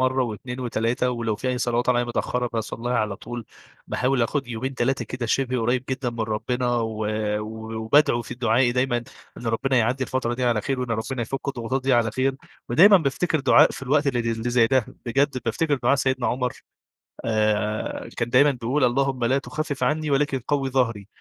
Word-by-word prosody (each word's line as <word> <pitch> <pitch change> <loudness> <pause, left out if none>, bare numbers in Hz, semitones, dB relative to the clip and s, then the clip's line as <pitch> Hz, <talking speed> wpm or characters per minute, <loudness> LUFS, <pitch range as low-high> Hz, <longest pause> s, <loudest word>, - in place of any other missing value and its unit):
مرة 130 0 +2
و2 125 +2 -5
و3 120 +1 0
ولو 115 -3 -2
في 130 +4 -3
أي 125 - -1
صلوات 120 0 0
عليّا 120 -1 +3
متأخرة 125 +1 -1
باصليها 115 +1 -3
على 105 -2 -1
طول، 120 +2 -7 0.4
باحاول 130 -1 +1
آخد 135 +2 -1
يومين، 125 +3 -4
3 130 +2 0
كده 125 -2 -4
شِبه 130 +1 0
قريب 120 +3 0
جدًا 130 -1 -1
من 115 -1 -6
ربنا، 120 +3 -1
و 110 -2 -2 0.7
وبادعو 120 +2 +3
في - - -7
دعائي 120 +1 +2
دايمًا 125 0 +1 0.4
إن 120 - -8
ربنا 130 +4 +1
يعدّي 125 +3 +1
الفترة 125 -2 -1
دي 125 +1 -2
على 120 -3 +2
خير، 135 +4 -2
وإن 125 -2 -3
ربنا 115 +3 -2
يفك 135 +4 -4
الضغوطات 130 0 -2
دي 135 +1 +1
على 120 -2 +3
خير. 130 +4 0 0.3
ودايمًا 195 - +7
بافتكر 160 0 0
دعاء - - +6
في - - -8
الوقت 145 +3 +2
اللي 130 -3 +1
اللي 115 +1 -2
زي 120 -1 +4
ده 130 -1 +2 0.2
بجد 135 +2 +1
بافتكر 150 +6 +1
دعاء 130 0 +2
سيدنا 130 -2 0
عمر 125 +2 -1 0.7
آآ 110 -1 0
كان 120 0 -1
دايمًا 140 +4 +5
بيقول 130 +3 -1
"اللهم 130 0 +1
لا 130 +3 +3
تخفف 145 0 -3
عنّي، 155 0 0
ولكن 140 -1 +1
قوي 140 -2 0
ظهري." 115 -6 0
125 Hz, 185 wpm, -24 LUFS, 115-135 Hz, 0.7 s, ودايمًا